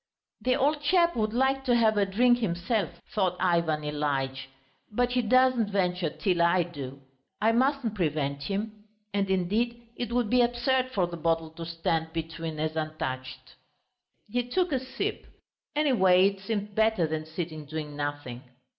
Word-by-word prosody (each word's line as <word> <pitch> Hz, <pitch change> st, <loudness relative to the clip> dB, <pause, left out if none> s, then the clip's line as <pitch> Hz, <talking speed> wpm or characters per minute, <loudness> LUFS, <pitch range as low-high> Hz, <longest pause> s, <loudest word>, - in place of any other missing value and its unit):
"The 255 Hz, 0 st, +2 dB
old 290 Hz, +2 st, +1 dB
chap 345 Hz, +2 st, +3 dB
would 215 Hz, -2 st, 0 dB
like 265 Hz, +3 st, +1 dB
to 245 Hz, -2 st, +3 dB
have 220 Hz, -2 st, +4 dB
a 200 Hz, -1 st, +2 dB
drink 240 Hz, +5 st, +4 dB
himself," 190 Hz, 0 st, 0 dB, 0.2 s
thought 185 Hz, -4 st, +1 dB
Ivan 170 Hz, -4 st, +1 dB
Ilyitch, 140 Hz, -3 st, -2 dB, 0.4 s
"but 245 Hz, +3 st, +1 dB
he 250 Hz, 0 st, +2 dB
doesn't 255 Hz, -1 st, +3 dB
venture 180 Hz, -3 st, 0 dB
till 180 Hz, +1 st, 0 dB
I 170 Hz, +1 st, +4 dB
do. 140 Hz, -5 st, -8 dB, 0.4 s
I 220 Hz, +1 st, +3 dB
mustn't 255 Hz, -1 st, +1 dB
prevent 150 Hz, -7 st, -1 dB
him. 210 Hz, +6 st, -4 dB, 0.3 s
And 200 Hz, -1 st, 0 dB
indeed 210 Hz, +6 st, 0 dB, 0.2 s
it 240 Hz, 0 st, -4 dB
would 240 Hz, -1 st, +1 dB
be 250 Hz, +3 st, +4 dB
absurd 245 Hz, +2 st, +1 dB
for 195 Hz, -8 st, +1 dB
the 175 Hz, 0 st, -6 dB
bottle 165 Hz, -1 st, 0 dB
to 165 Hz, +1 st, -7 dB
stand 165 Hz, -1 st, -1 dB
between 165 Hz, -1 st, -4 dB
as 155 Hz, +1 st, -1 dB
untouched." 130 Hz, -5 st, -4 dB, 0.7 s
He 245 Hz, +4 st, 0 dB
took 355 Hz, +8 st, 0 dB
a 265 Hz, -, +1 dB
sip, 260 Hz, +1 st, -4 dB, 0.5 s
anyway 195 Hz, -11 st, +5 dB
it 195 Hz, -1 st, -9 dB
seemed 205 Hz, +1 st, -3 dB
better 220 Hz, -4 st, +3 dB
than 155 Hz, 0 st, -3 dB
sitting 160 Hz, -2 st, -5 dB
doing 150 Hz, 0 st, -5 dB
nothing. 145 Hz, -4 st, -4 dB
190 Hz, 160 wpm, -28 LUFS, 160-240 Hz, 0.7 s, anyway